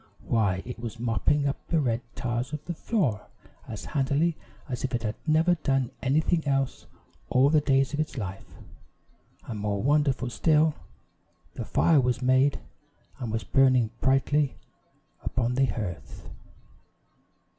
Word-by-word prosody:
Why, 100 -5 +1
it 125 -1 -7
was 115 0 -6
mopping 120 +5 +1
up 140 - -4
the 165 - +2
red 120 -5 0
tiles 120 +3 -3
of 150 0 -5
the 175 - -3
floor 155 - -1 0.4
as 110 - -7
handily 150 +3 +1 0.3
as 125 -4 -4
if 130 -1 -1
it 120 - -3
had 105 -2 -1
never 160 +3 +4
done 135 -6 0
anything 155 +5 +1
else 135 -1 -1 0.4
all 135 +3 +4
the 155 -1 +4
days 135 -1 +2
of 145 - -2
its 155 -3 -2
life; 95 -3 -6 0.9
and 110 -3 -5
more 100 -1 -1
wonderful 140 -3 +2
still, 155 +8 +3 0.8
the - - -5
fire 160 -4 +3
was 125 -1 0
made, 130 +2 +3 0.6
and 120 -4 -4
was 115 0 -2
burning 130 -4 +3
brightly 135 +1 +2 0.7
upon 120 -1 -1
the 135 +2 +3
hearth! 95 - -6
130 Hz, 145 wpm, -27 LUFS, 120-150 Hz, 0.9 s, never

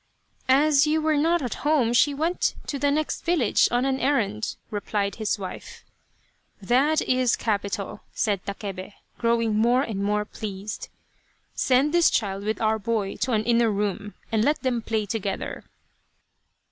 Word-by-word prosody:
" - - -35 0.2
As 300 -1 +4
you 310 +1 +2
were 310 0 +1
not 330 +2 +2
at 245 - -2
home, 285 -6 +2
she 290 +4 +4
went 320 +5 0
to 280 - -4
the 285 - +2
next 305 +2 -1
village 330 -11 +3
on 245 +2 +1
an 265 0 0
errand," 220 -7 0 0.2
replied 205 -1 -2
his 215 -1 -1
wife. 190 -2 -8 0.4
" - - -38 0.3
That 265 +10 +2
is 255 -2 +2
capital! 205 -1 -3
" - - -38
said 200 -3 -1
Takebe, 200 -1 -6 0.3
growing 230 -2 +1
more 240 +4 +3
and 210 -7 -4
more 210 +1 0
pleased. 205 -1 -6 0.3
" - - -41
Send 270 +4 +2
this 345 -1 +5
child 200 -2 -1
with 215 +1 -1
our 220 0 +1
boy 210 -2 -2
to 255 - -1
an 215 -1 +2
inner 235 0 +3
room, 205 0 -2 0.2
and 220 -1 +2
let 295 +4 +1
them 250 -3 0
play 220 -1 -1
together." 200 -2 -4
230 Hz, 170 wpm, -25 LUFS, 210-275 Hz, 0.4 s, this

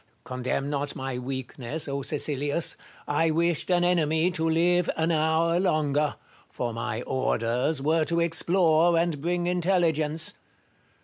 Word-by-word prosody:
Condemn 130 +2 -3
not 145 0 -3
my 130 -1 -4
weakness, 130 +3 -4
O 140 0 -2
Cfecilius! 145 +2 0 0.3
I 160 +3 +2
wished 170 +1 0
an 175 -1 +3
enemy 170 -1 +2
to 165 -2 -1
live 175 +2 +2
an 160 +1 +1
hour 160 +2 +2
longer; 150 -5 +1 0.3
for 120 -2 -4
my 115 0 -3
orders 130 +3 -1
were 160 +2 +2
to 170 +1 0
explore 170 0 +3
and 165 -4 0
bring 175 +2 -1
intelligence. 170 -4 0
160 Hz, 130 wpm, -26 LUFS, 140-170 Hz, 0.3 s, an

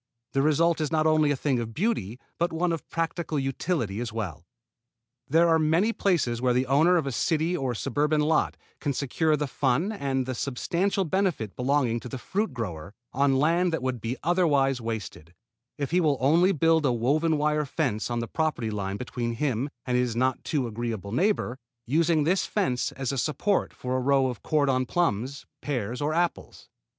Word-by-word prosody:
The 135 - +2
result 160 +3 +2
is 155 - -1
not 155 -1 +2
only 155 -1 +4
a 145 - +2
thing 130 -2 0
of 115 -1 -5
beauty 125 - -1 0.2
but 170 +1 +1
one 170 +2 0
of 165 -3 -4
practical 165 -1 -2
utility 135 - -1
as 120 -2 -4
well. 90 -7 -5 0.8
There 165 +4 +4
are 165 -1 +4
many 165 +9 +2
places 145 - 0
where 125 -1 +2
the 130 +1 +2
owner 155 +7 +4
of 160 - 0
a 135 - -2
city 160 +6 0
or 130 -7 -2
suburban 150 +6 0
lot 155 +1 +1 0.2
can 145 -2 -1
secure 150 +4 +1
the 150 - -1
fun 140 - 0
and 135 -10 -1
the 130 - -3
substantial 175 +10 -1
benefits 170 - -1
belonging 125 -2 +1
to 125 - -9
the 130 - -5
fruit 205 - -2
grower 100 -6 -6 0.2
on 135 0 +3
land 170 +5 +2
that 160 -5 -2
would 130 -3 -2
be 115 +3 -3
otherwise 145 -7 +2
wasted, 105 -7 -6 0.4
if 140 0 -3
he 180 +1 +3
will 150 -4 +2
only 165 +8 +4
build 165 -1 +3
a 135 - +3
woven 150 +7 +1
wire 150 0 +1
fence 125 -8 -1
on 120 - -2
the 115 - -4
property 150 -8 -1
line 100 -1 -3
between 120 -1 -3
him 130 0 -1 0.2
and 125 - 0
his 125 -2 0
not 130 +1 0
too 145 -5 -1
agreeable 115 -3 -4
neighbor, 135 - 0 0.3
using 160 +3 +2
this 180 +5 +1
fence 155 - 0
as 135 -1 -3
a 135 - -2
support 160 - 0
for 125 0 -4
a - - -1
row 135 +1 +3
of 125 - -6
cordon 135 -4 +1
plums, 140 -5 -1 0.2
pears 125 -3 -3
or 145 +1 0
apples. 170 +2 -2
140 Hz, 190 wpm, -26 LUFS, 125-160 Hz, 0.8 s, only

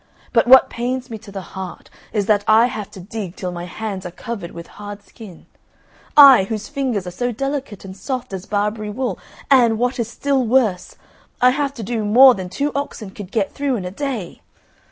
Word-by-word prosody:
But 230 -1 +3
what 265 +1 +8
pains 250 +1 -3
me 220 - -6
to 210 -2 -13
the 195 -2 -8
heart 190 -2 -8 0.2
is 205 -2 0
that 205 -1 +2
I 220 +2 +6
have 215 -5 -4
to - - -12
dig 195 -1 -6
till 180 -1 -4
my 175 0 -6
hands 195 +1 -5
are 180 - -5
covered 195 0 -7
with 170 -1 -9 0.2
hard 205 0 -8
skin 205 -6 -13 0.7
I 270 -9 +9
whose 215 0 -4
fingers 260 -9 -2
are 180 - -5
so 245 +7 -2
delicate 275 -4 -4
and 190 0 -9
soft 255 -1 -5
as 190 -1 -6
Barbary 210 +1 -1
wool; 230 -3 -3 0.3
and, 240 -4 +5
what 245 +2 -1
is 230 - -1
still 275 +2 0
worse, 225 -6 +1 0.4
I 250 0 +5
have 280 +1 -2
to 230 - -6
do 225 +1 -2
more 250 +5 +7
than 185 -4 -6
two 285 +10 -2
oxen 275 -8 -5
could 195 -2 -9
get 210 -4 0
through 280 -2 -1
in 195 -6 -4
a 180 - -5
day. 230 - -5
220 Hz, 205 wpm, -20 LUFS, 195-255 Hz, 0.7 s, I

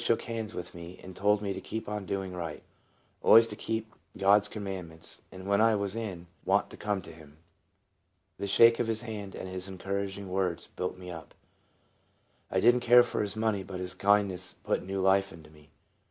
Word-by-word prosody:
shook 115 - +2
hands 115 -1 -4
with 90 0 -6
me, 85 +1 -10
and 95 0 -10
told 105 +1 +2
me 100 -1 -1
to - - -6
keep 110 0 -5
on 105 -2 -4
doing 95 -1 -3
right, 85 -4 -5 0.6
always 115 0 +8
to - - -6
keep 110 0 -3 0.2
God's 100 +1 +5
commandments, 95 -6 -6
and 95 0 -10
when 100 +1 +3
I 115 -1 +5
was 100 0 -2
in 100 -7 -5 0.2
want - - +2
to - - -9
come 105 -3 -2
to 85 - -10
him. 80 -2 -15 1.0
The 100 - -2
shake 115 +4 +6
of 120 - +1
his 115 0 -1
hand 105 -4 -6
and - - -6
his 95 0 -5
encouraging 100 +1 -4
words 90 -2 -1
built 90 0 -4
me 90 -1 -8
up. 80 -1 -10 1.1
I 95 - +1
did 120 +5 +6
n't 125 - 0
care 120 +1 +7
for 120 - -2
his 100 -1 -2
money, 110 -2 0
but 95 -1 -7
his 90 0 -4
kindness 100 -3 +2
put - - 0
new 95 +1 -3
life 95 +1 +3
into 80 -2 -13
me. 75 -1 -19
100 Hz, 200 wpm, -30 LUFS, 90-105 Hz, 1.1 s, always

